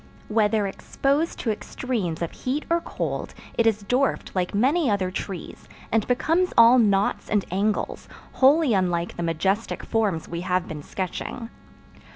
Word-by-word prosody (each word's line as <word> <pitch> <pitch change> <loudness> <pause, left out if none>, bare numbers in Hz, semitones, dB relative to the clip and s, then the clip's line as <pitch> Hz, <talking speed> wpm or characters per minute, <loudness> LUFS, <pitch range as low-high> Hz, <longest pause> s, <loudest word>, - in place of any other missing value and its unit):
Whether 215 -1 +2
exposed 280 - -1
to 225 - 0
extremes 210 -7 -3
of 170 - -3
heat 270 +4 -3
or 340 0 +3
cold, - - -4 0.2
it 230 - +3
is 215 -2 +1
dwarfed 255 +6 0
like 185 +1 -1
many 275 +7 +3
other 190 -3 0
trees, 190 -1 -7 0.2
and 220 -1 +1
becomes 330 +8 +2
all 235 +2 +8
knots 200 -3 +2
and 210 -2 +1
angles, 205 +3 -1 0.2
wholly 280 0 +4
unlike 175 -3 0
the - - -5
majestic 190 +6 -1
forms 200 -8 0
we 170 0 -4
have 180 0 0
been 150 -2 -6
sketching. 195 - -5
210 Hz, 150 wpm, -24 LUFS, 185-250 Hz, 0.2 s, all